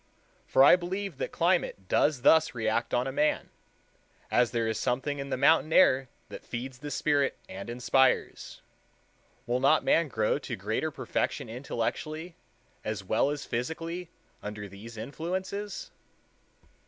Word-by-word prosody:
For 135 - +5
I 140 - +9
believe 180 -2 -4
that - - -3
climate 170 - 0
does 145 +2 +2
thus 160 -3 +5
react 115 +1 0
on 125 +2 0
man—as 130 -4 -2
there 115 -1 -1
is 110 - -1
something 140 +3 -1
in 140 0 -5
the 130 - -1
mountain 155 +3 +4
air 135 -7 +5 0.2
that - - -9
feeds 130 +2 -6
the 145 +1 -6
spirit 145 -2 +1
and 95 +4 -8
inspires. 125 +2 +1 0.8
Will 120 +2 0
not 145 +4 +4
man 165 -1 +3
grow 110 +1 0
to 125 -4 -5
greater 110 +9 -2
perfection 145 - -2
intellectually 155 +7 -4 0.5
as 110 -3 -3
well 110 +8 +2
as 145 -1 -4
physically 165 +8 -4 0.3
under 105 0 -6
these 105 +4 -11
influences? 185 - -4
135 Hz, 135 wpm, -29 LUFS, 115-160 Hz, 0.8 s, I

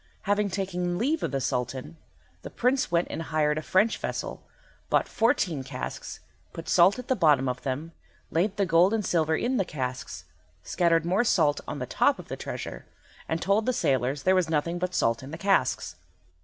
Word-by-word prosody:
Having 205 0 +1
taken 180 -2 -2
leave 290 - 0
of - - -1
the 135 - -1
Sultan, 130 +2 -3 0.5
the - - -8
Prince 255 +2 +1
went 170 0 +1
and - - -4
hired 155 -2 0
a - - -5
French 200 +7 +2
vessel, - - -4 0.5
bought - - +2
fourteen 190 - +1
casks, 130 - -6 0.3
put 165 - -8
salt 185 +4 +5
at 250 - -7
the 260 - +2
bottom 150 - +3
of 125 0 -2
them, 140 +5 -4 0.4
laid 190 +5 0
the 200 - +2
gold 180 +4 +4
and 210 -3 -2
silver 160 -2 +1
in 255 +7 0
the 195 - +2
casks, 130 -6 -5 0.4
scattered 165 -2 +2
more 185 +6 +2
salt 155 -10 +2
on - - -4
the - - -3
top - - +2
of - - -11
the - - -3
treasure, - - -7 0.4
and 160 0 -1
told 200 +5 +2
the 255 - +2
sailors 135 - 0
that - - -19
there 185 - +5
was 185 -3 +2
nothing 165 +3 0
but 180 0 -2
salt 115 0 +1
in 135 - -9
the 160 - -6
casks. 195 +2 +1
170 Hz, 195 wpm, -27 LUFS, 150-200 Hz, 0.5 s, salt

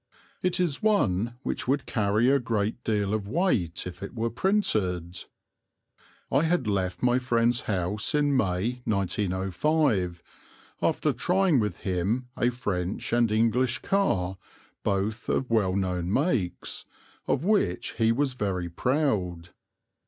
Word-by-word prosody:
It 185 0 0
is 170 -6 0
one 120 - +2
which - - -3
would 135 +1 +1
carry 105 +2 +1
a 140 - +4
great 115 -1 -2
deal 105 -2 0
of 105 -2 -2
weight 110 - 0
if 90 - -8
it 100 - -7
were 115 0 -1
printed. 100 - 0 1.1
I 135 - +4
had 165 -4 +1
left 95 -2 -1
my 125 0 +4
friend's 120 -1 +2
house 100 +5 0
in 145 -1 +2
May, 110 +2 0
1905, 95 - 0 0.6
after - - +1
trying 180 -5 +2
with 105 -5 -1
him 100 +7 -1
a 120 - +2
French 100 -7 -3
and 120 -2 +3
English 115 +3 +2
car, 95 - 0 0.4
both 100 +3 -1
of 125 - 0
well 100 -5 +2
known 90 -2 -1
makes, 120 - -1 0.4
of 135 - +1
which 185 - +1
he 115 0 +4
was 135 +2 +1
very 95 -7 -2
proud. 90 - -1
110 Hz, 130 wpm, -27 LUFS, 95-130 Hz, 1.1 s, a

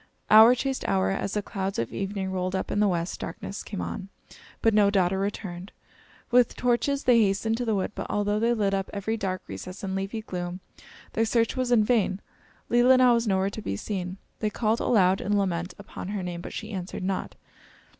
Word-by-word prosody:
Hour 220 +3 +9
chased 265 +1 -2
hour, 190 -1 +2
as 195 +1 -2
the 210 - 0
clouds 195 -1 -3
of 115 - -2
evening 195 -1 -3
rolled 185 0 -2
up 190 - -3
in - - 0
the 210 - +4
west; 175 -2 -2
darkness 195 +4 -6
came 200 - -5
on, 190 - -5 0.5
but 225 - +3
no 205 -1 +5
daughter 190 -1 +2
returned. 195 -2 -4 0.6
With 245 -1 +4
torches 250 +3 +1
they 240 -2 +5
hastened 215 +2 +1
to 245 - -2
the 220 -2 +1
wood, 195 - -1
but - - -5
although 205 0 0
they 235 +2 +2
lit 200 -3 +1
up 195 -1 -1
every 205 +2 -2
dark 190 -3 -3
recess 100 - -8
and 190 -1 -3
leafy 195 +3 -3
gloom, 180 -2 -5 0.5
their 225 - +2
search 230 0 +1
was 255 -1 -1
in 230 -3 +5
vain. 210 -4 +1 0.5
Leelinau 250 +1 +5
was 235 -1 +1
nowhere 190 0 +1
to 220 - -6
be 100 - -3
seen. 185 - -4 0.2
They 215 - 0
called 220 +1 0
aloud, 190 -4 +3
in 205 0 +1
lament, 180 -2 -1
upon 200 -2 -8
her 200 -1 -3
name, 175 -1 -5
but - - -7
she 220 +1 -6
answered 185 -2 -5
not. 190 0 -3
200 Hz, 205 wpm, -26 LUFS, 190-225 Hz, 0.6 s, Hour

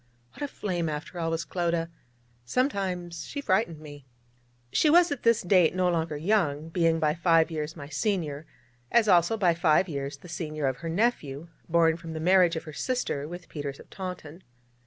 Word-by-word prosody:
What - - -14
a 290 - -1
flame, 175 - -3
after 150 +4 -5
all, 165 -1 -1
was 165 +1 -2
Clodagh! 170 -2 -1 0.6
Sometimes 180 - -1
she 285 - -6
frightened 190 - 0
me. 145 -3 -12 0.6
She 310 - +3
was 345 +1 +5
at 285 - -3
this 230 -1 +3
date 180 -2 +4
no 185 -1 +2
longer 160 -3 -1
young, 160 -4 0
being 165 -1 +2
by 155 -1 +2
five 165 -1 +3
years 155 0 -4
my 145 -4 -8
senior, 155 -2 -2 0.4
as 230 -2 +4
also, 180 +3 +4
by 180 -5 +3
five 165 +2 +3
years, 140 -3 -4
the 140 - -14
senior 155 -3 -4
of 130 -1 0
her 165 +5 -5
nephew, 165 - -1 0.2
born 165 -1 +3
from 165 -1 -8
the 160 - -4
marriage 180 0 +4
of 160 - -4
her 155 -2 -9
sister 195 - -2
with 175 +1 -9
Peters 145 -2 -6
of - - -15
Taunton. 180 -3 -7
165 Hz, 185 wpm, -27 LUFS, 155-185 Hz, 0.6 s, was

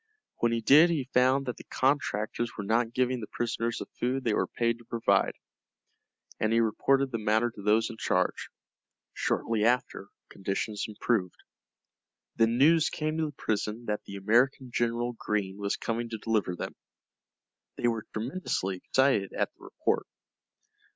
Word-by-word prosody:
When 120 - +1
he 115 0 0
did 150 +9 +7
he 140 -6 -2
found 130 +2 +4
that 125 - -4
the - - -11
contractors 120 -4 -1
were 105 - -3
not 115 +3 +1
giving 125 +1 0
the 105 - -6
prisoners 115 0 -2
the - - -5
food 130 +2 0
they 115 - +1
were - - +1
paid 115 0 -1
to 120 - -16
provide, 115 0 +2 1.1
and 110 - +1
he 115 - +4
reported 135 +5 +2
the 115 - -2
matter 110 +2 +2
to 105 - -11
those 110 +2 +3
in 115 - -10
charge. - - 0 0.6
Shortly 115 -2 0
after 125 +3 +1 0.2
conditions 100 +2 -3
improved. 105 -3 -1 1.0
Then 115 +1 +3
news 160 +4 +5
came 155 +1 -2
to 160 - +1
the - - -6
prison 110 +2 -2
that 105 -1 -2
the 100 - -8
American 120 +6 +2
General 120 +1 0
Greene 105 -3 -2
was 100 0 -1
coming 115 +1 -3
to 115 - -4
deliver 105 -4 0
them. - - -5 1.0
They 120 - +1
were 115 -2 -1
tremendously 110 - -2
excited 130 -3 +1
at - - -1
the - - -17
report. - - -1
115 Hz, 160 wpm, -29 LUFS, 110-125 Hz, 1.1 s, did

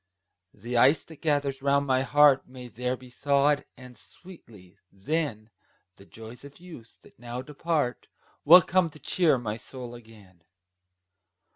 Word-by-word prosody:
The 120 +1 -4
ice 135 +6 +4
that 160 -2 -16
gathers 140 -3 -1
round 140 +1 +1
my 130 -1 +1
heart 145 0 +4
May 125 -1 -11
there 125 +3 -3
be 125 0 -16
thawed; 140 +2 +1
and 125 -1 -13
sweetly, 105 - -17
then, 110 0 -4 0.5
The 100 - -18
joys 115 +3 -12
of 140 +2 -14
youth, 165 -11 -14
that - - -21
now 120 +1 -7
depart, 150 -2 -3 0.4
Will 175 +3 +8
come 185 -1 +1
to 155 - -16
cheer 165 -5 +1
my 110 -3 -5
soul 120 +1 -10
again. 110 -7 -16
130 Hz, 145 wpm, -26 LUFS, 115-145 Hz, 0.5 s, Will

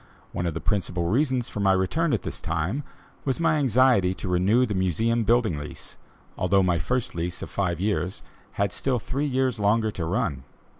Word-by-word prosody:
One 90 0 -2
of 85 - -3
the - - -2
principal 90 -4 -1
reasons 130 - +1
for - - -6
my 100 -1 +4
return 145 - +1
at - - 0
this - - -5
time, 85 - -2 0.4
was 135 +1 -1
my 165 -2 +3
anxiety 125 -8 +3
to - - -6
renew 95 +8 +3
the 110 - -3
Museum 105 +6 +1
building 110 -8 +2
lease, 75 - -9 0.4
although 95 +1 +3
my 90 -2 +2
first 125 +9 -1
lease 85 +1 -3
of - - -8
five 90 -4 -1
years 95 -2 -1 0.3
had 100 -1 0
still 130 +8 -1
three 135 +6 -2
years 130 -3 0
longer 110 +2 +2
to 85 -5 -4
run. 80 - -1
100 Hz, 190 wpm, -25 LUFS, 90-125 Hz, 0.4 s, my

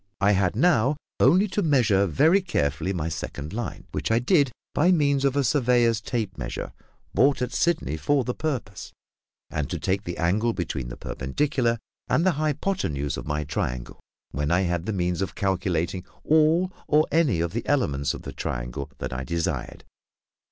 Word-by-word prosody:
I 100 0 +4
had 95 -1 +2
now 140 -1 +3 0.2
only 190 +4 +5
to 205 - 0
measure 115 - +3
very 160 - +4
carefully 85 - -1
my 85 -4 -2
second 75 0 -5
line, 120 -2 -5
which - - -2
I 110 - +3
did 140 +2 +3 0.2
by 175 +5 +4
means 140 -5 +2
of 140 -1 +2
a 140 - +2
surveyor's 120 -4 +3
tape 105 - -3
measure, - - -5 0.4
bought 135 +6 +4
at 125 0 -2
Sydney 165 - 0
for 140 - +1
the 125 - -2
purpose, 125 - -4 0.6
and 75 -3 -2
to - - -2
take 95 +2 -1
the 85 - -4
angle 105 +7 +1
between 75 - -3
the - - -8
perpendicular 120 - -1 0.3
and 165 - +2
the 185 - +5
hypothenuse 145 - -1
of - - -7
my 75 0 -1
triangle, 65 -4 -4 0.3
when 75 +2 -2
I 90 +3 +3
had 85 -1 -1
the - - 0
means 90 -2 -1
of 95 - -3
calculating 90 -2 -1 0.2
all 160 +4 +3 0.2
or 150 +1 +4
any 150 - +3
of 85 +1 -1
the 115 - -3
elements 70 - +1
of - - -9
the - - -7
triangle 60 +3 -4
that - - -5
I 65 +1 -3
desired. 85 +5 -3
105 Hz, 175 wpm, -25 LUFS, -, 0.6 s, only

